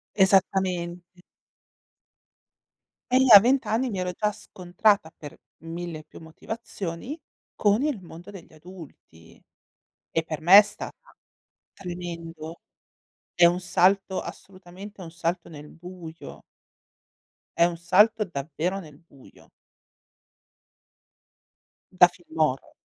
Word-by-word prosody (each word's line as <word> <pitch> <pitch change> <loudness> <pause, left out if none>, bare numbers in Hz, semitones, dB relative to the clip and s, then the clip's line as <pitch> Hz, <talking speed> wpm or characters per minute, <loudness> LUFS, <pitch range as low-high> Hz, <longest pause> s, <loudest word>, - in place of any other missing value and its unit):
Esattamente. 185 -2 +1 1.9
E 255 - +6
io 265 - +4
a 200 - +11
20 260 +4 +2
anni 240 +4 0
mi 195 -4 -4
ero 180 0 -3
già 210 +3 -1
scontrata 185 -2 0
per 150 -3 -12 0.3
mille 165 -2 -7
più 155 - -15
motivazioni 200 - -7 0.4
con 210 +2 +2
il 290 -8 -1
mondo 175 +2 -12
degli 185 -5 -13
adulti, 155 - -15 0.7
e 165 - -1
per 155 -2 -6
me 180 +5 +8
è - - +11
stata - - -10 0.6
tremendo. 170 -2 -8 0.7
È 175 - +5
un 175 +1 +4
salto 190 +2 +1
assolutamente 190 +2 -11
un 165 - -9
salto 170 +1 -3
nel 150 -1 -11
buio 170 -1 -11 1.2
è - - +4
un 170 -1 -2
salto 210 +6 +3
davvero 165 +3 -4
nel 150 -6 -13
buio. 145 -5 -20 2.4
Da 180 -1 +7
film 175 -2 -13
horror. 135 -4 0
180 Hz, 110 wpm, -25 LUFS, 165-195 Hz, 2.4 s, a